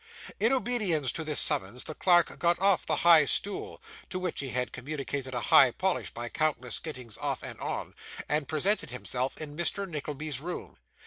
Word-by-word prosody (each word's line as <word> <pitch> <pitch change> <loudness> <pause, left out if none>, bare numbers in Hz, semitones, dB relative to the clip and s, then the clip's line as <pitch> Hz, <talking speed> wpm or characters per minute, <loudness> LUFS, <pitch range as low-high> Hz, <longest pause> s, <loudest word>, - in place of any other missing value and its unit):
In 225 +3 +3
obedience 215 - 0
to 160 - -5
this 155 -2 +2
summons 100 +7 +1
the 155 - -7
clerk 175 0 +3
got 170 0 +2
off 195 -1 +3
the - - +2
high 165 -3 +9
stool 200 +7 -1 0.3
(to 185 - -4
which 185 -2 -3
he 135 - -3
had 125 0 -2
communicated 135 -1 -5
a - - 0
high 135 +2 +7
polish 185 +9 -1
by 120 0 -6
countless 125 -3 -1
gettings 125 -8 -7
off - - -3
and - - -7
on), - - -4 0.3
and 150 -1 -1
presented 190 +7 0
himself 125 +1 -3
in 150 -2 -7
Mr. 175 +4 -2
Nickleby's 150 -3 -4
room. 175 +3 -7
155 Hz, 180 wpm, -28 LUFS, 130-175 Hz, 0.3 s, high